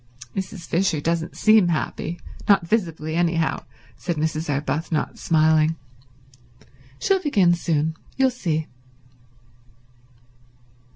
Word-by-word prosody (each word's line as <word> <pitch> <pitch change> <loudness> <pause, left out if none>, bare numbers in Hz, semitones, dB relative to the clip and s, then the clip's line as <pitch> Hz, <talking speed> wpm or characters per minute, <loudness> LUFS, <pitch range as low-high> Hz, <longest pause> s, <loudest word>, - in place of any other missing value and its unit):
"Mrs. 190 -2 -5
Fisher 170 -3 +1
doesn't 165 +2 -2
seem 215 -4 +5
happy—not 175 +3 -1
visibly, 165 -6 -1
anyhow," 165 -1 0 0.3
said 175 -2 -3
Mrs. 155 +1 -2
Arbuthnot, 145 +3 -2
smiling. 160 0 +3 1.2
"She'll 385 - +1
begin 195 - +3
soon, 160 -2 0 0.2
you'll 265 -1 +3
see." 160 -10 -2
165 Hz, 90 wpm, -23 LUFS, 155-185 Hz, 1.2 s, seem